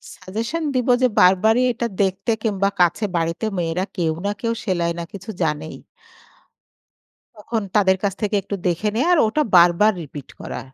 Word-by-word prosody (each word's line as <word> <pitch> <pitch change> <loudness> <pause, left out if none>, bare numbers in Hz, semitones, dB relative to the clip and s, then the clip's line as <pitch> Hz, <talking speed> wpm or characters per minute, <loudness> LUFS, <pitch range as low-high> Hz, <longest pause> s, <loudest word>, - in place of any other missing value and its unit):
Suggestion 230 - -4
দিব 255 0 0
যে 255 - +5
বারবারই 220 +7 +4
এটা 235 +1 -2
দেখতে 195 +4 0
কিংবা 200 -2 +1
কাছে 175 +5 +2
বাড়িতে 165 +5 -1
মেয়েরা 170 +3 -1
কেউ 165 -3 +1
না 205 - +1
কেউ 230 -1 0
সেলাই 175 -3 0
না - - -3
কিছু 200 +3 -9
জানেই। 155 0 -3 1.6
তখন 220 +2 -3
তাদের 190 -2 +4
কাছ 200 -2 0
থেকে 210 0 0
একটু 200 - -5
দেখে 175 +5 0
নেয়া 255 +9 +1
আর 335 - +2
ওটা 300 +8 +1
বারবার 175 +5 +5
রিপিট 145 -2 -10
করা। - - -6
200 Hz, 160 wpm, -21 LUFS, 175-225 Hz, 1.6 s, যে